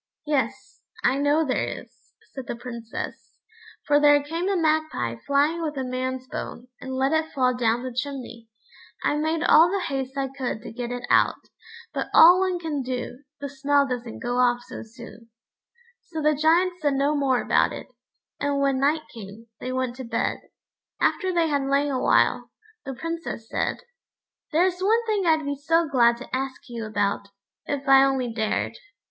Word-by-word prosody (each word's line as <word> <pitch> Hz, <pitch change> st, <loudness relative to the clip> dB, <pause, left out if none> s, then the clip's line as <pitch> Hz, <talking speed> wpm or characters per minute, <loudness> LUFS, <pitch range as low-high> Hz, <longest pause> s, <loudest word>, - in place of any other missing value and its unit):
"Yes, 265 Hz, -3 st, -2 dB, 0.2 s
I 275 Hz, -, +2 dB
know 290 Hz, +3 st, +2 dB
there 260 Hz, -, 0 dB, 0.2 s
is," -, -, -28 dB, 0.2 s
said 265 Hz, -3 st, -7 dB
the -, -, -3 dB
Princess, 235 Hz, -1 st, -7 dB, 0.5 s
"for 290 Hz, -1 st, +4 dB
there 290 Hz, -1 st, +5 dB
came 330 Hz, +6 st, -2 dB
a 395 Hz, -, +1 dB
magpie 310 Hz, -, 0 dB
flying 295 Hz, +4 st, +2 dB
with 305 Hz, -3 st, -3 dB
a 265 Hz, -, -1 dB
man's 255 Hz, 0 st, -3 dB
bone, 245 Hz, 0 st, -7 dB
and 260 Hz, 0 st, -6 dB
let 265 Hz, +2 st, +1 dB
it 315 Hz, 0 st, 0 dB
fall 255 Hz, -2 st, +2 dB
down 240 Hz, 0 st, +1 dB
the 255 Hz, -1 st, -5 dB
chimney. 250 Hz, -3 st, -5 dB, 0.5 s
I -, -, +2 dB
made 315 Hz, +2 st, 0 dB
all 330 Hz, +1 st, +6 dB
the 395 Hz, +2 st, 0 dB
haste 270 Hz, -5 st, -4 dB
I 270 Hz, -1 st, -1 dB
could 255 Hz, -5 st, -4 dB
to -, -, -8 dB
get 240 Hz, 0 st, -4 dB
it 245 Hz, 0 st, -4 dB
out, -, -, +4 dB, 0.6 s
but -, -, -2 dB
all 350 Hz, +3 st, +9 dB
one 375 Hz, -1 st, +1 dB
can 315 Hz, -5 st, -3 dB
do, 250 Hz, 0 st, -4 dB, 0.2 s
the 285 Hz, -, -4 dB
smell 280 Hz, +1 st, +2 dB
doesn't 245 Hz, -3 st, -5 dB
go 245 Hz, +1 st, -1 dB
off 245 Hz, -1 st, +2 dB
so -, -, -8 dB
soon." 230 Hz, 0 st, -13 dB, 0.7 s
So 320 Hz, -, -7 dB
the 305 Hz, 0 st, +3 dB
Giant 340 Hz, +5 st, +2 dB
said 290 Hz, -2 st, +1 dB
no 280 Hz, +2 st, +1 dB
more 270 Hz, -3 st, +2 dB
about -, -, +2 dB
it, -, -, -7 dB, 0.5 s
and 285 Hz, -1 st, 0 dB
when 275 Hz, -1 st, +1 dB
night 300 Hz, +3 st, +2 dB
came, 220 Hz, 0 st, -11 dB
they 255 Hz, -, -4 dB
went 255 Hz, -1 st, -2 dB
to 260 Hz, -, -6 dB
bed. 230 Hz, -1 st, -1 dB, 0.6 s
After 375 Hz, -2 st, +1 dB
they 340 Hz, -2 st, +2 dB
had 285 Hz, -2 st, +1 dB
lain 280 Hz, +1 st, +2 dB
a 255 Hz, -1 st, -1 dB
while, -, -, +2 dB, 0.4 s
the 270 Hz, -, -5 dB
Princess 330 Hz, -6 st, -5 dB
said: -, -, -2 dB, 0.7 s
"There 330 Hz, +3 st, +4 dB
is 365 Hz, -1 st, -1 dB
one 450 Hz, +4 st, +2 dB
thing 415 Hz, -5 st, 0 dB
I'd 315 Hz, -2 st, +3 dB
be 285 Hz, -, -1 dB
so 325 Hz, +4 st, +1 dB
glad 235 Hz, -4 st, +4 dB
to 250 Hz, -, -6 dB
ask 265 Hz, 0 st, -4 dB
you 230 Hz, -2 st, -5 dB
about, 205 Hz, -1 st, -1 dB, 0.4 s
if 280 Hz, -1 st, -3 dB
I 270 Hz, 0 st, +7 dB
only 265 Hz, -3 st, 0 dB
dared." 220 Hz, -, -2 dB
275 Hz, 185 wpm, -25 LUFS, 245-310 Hz, 0.7 s, all